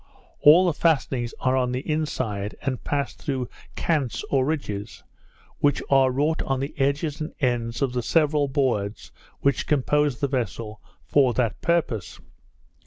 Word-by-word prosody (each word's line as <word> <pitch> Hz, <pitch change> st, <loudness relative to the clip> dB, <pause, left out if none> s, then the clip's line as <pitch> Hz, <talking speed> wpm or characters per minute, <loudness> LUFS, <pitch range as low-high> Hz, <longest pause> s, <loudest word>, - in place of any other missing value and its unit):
All 165 Hz, +5 st, +7 dB
the 175 Hz, -, +2 dB
fastenings 135 Hz, -7 st, +1 dB
are 130 Hz, 0 st, +2 dB
on 125 Hz, -1 st, +1 dB
the 130 Hz, +3 st, -4 dB
inside, 130 Hz, -10 st, -2 dB
and 130 Hz, -2 st, -2 dB
pass 140 Hz, -1 st, -1 dB
through 130 Hz, -3 st, -3 dB, 0.3 s
kants 145 Hz, -8 st, -1 dB
or 135 Hz, -2 st, +3 dB
ridges, 105 Hz, -10 st, -4 dB, 0.6 s
which 145 Hz, -1 st, +2 dB
are 135 Hz, -1 st, +5 dB
wrought 145 Hz, +5 st, 0 dB
on 135 Hz, -1 st, -1 dB
the 140 Hz, +2 st, -4 dB
edges 140 Hz, +3 st, 0 dB
and 155 Hz, -, -4 dB
ends 120 Hz, -1 st, 0 dB
of 130 Hz, -2 st, 0 dB
the 125 Hz, -, 0 dB
several 150 Hz, +2 st, +2 dB
boards 120 Hz, -7 st, -1 dB, 0.3 s
which 140 Hz, -2 st, +1 dB
compose 145 Hz, -2 st, +1 dB
the 140 Hz, -, +1 dB
vessel, 115 Hz, -4 st, -3 dB, 0.2 s
for 130 Hz, -4 st, +3 dB
that 120 Hz, -4 st, 0 dB
purpose. 150 Hz, -, -1 dB
135 Hz, 150 wpm, -24 LUFS, 120-150 Hz, 0.6 s, All